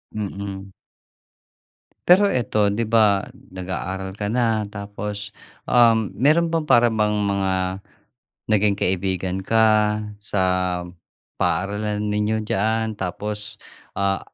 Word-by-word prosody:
Mm. 100 -2 -5 1.4
Pero 185 +3 +7
eto, 105 -4 +1
‘di 110 +2 -1
ba, 105 -3 +3 0.2
nag-aaral 95 +1 -5
ka 105 0 -3
na, 115 -3 +1
tapos, 100 0 -6 0.3
um, 115 -3 +4
meron 155 +8 +3
bang 165 -1 -1
para 120 -5 +5
bang 110 -2 +1 0.2
mga 100 -1 0 1.0
naging 105 -1 +3
kaibigan 95 0 -1
ka 110 +3 +3 0.6
sa 100 -2 -2 1.0
paaralan 105 +2 -1
ninyo 105 +1 0
diyaan? 110 +2 0
Tapos, 105 +2 -5 0.4
ah, 100 -1 0
105 Hz, 100 wpm, -22 LUFS, 95-110 Hz, 1.4 s, Pero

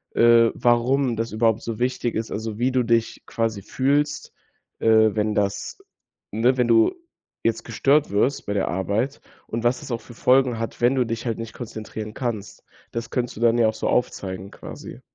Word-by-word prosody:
äh, 115 -1 +6
warum 120 +1 +2
das 115 +1 -3
überhaupt 110 0 +1
so 115 -1 -5
wichtig 125 -1 -1
ist, 110 0 -3
also 110 0 -4
wie 125 +2 +2
du 130 -1 +2
dich 115 -1 0
quasi 115 -3 -2
fühlst, 145 +6 0 0.5
äh, - - -5 0.3
wenn 105 0 0
das 100 -1 -2 0.5
ne? 120 +5 +2
Wenn 125 -1 +2
du 115 -1 +5 0.5
jetzt 115 0 0
gestört 140 +6 +2
wirst 120 +7 +1
bei 100 - -2
der 100 - 0
Arbeit 100 +9 -1 0.3
und 115 +1 -4
was 120 +2 +2
das - - -8
auch 115 - -1
für 120 - -13
Folgen 125 0 +3
hat, 115 - -5
wenn 120 +3 +4
du 130 -2 +2
dich 115 +1 -4
halt 115 -2 -1
nicht 115 0 -6
konzentrieren 110 -2 -7
kannst. 110 -5 -5 0.3
Das 115 0 -4
könntest 125 -2 -2
du - - -7
dann 120 0 +4
ja 115 -2 +4
auch 110 - 0
so 110 - -3
aufzeigen 95 -5 -2
quasi. - - -10
115 Hz, 190 wpm, -23 LUFS, 110-125 Hz, 0.5 s, äh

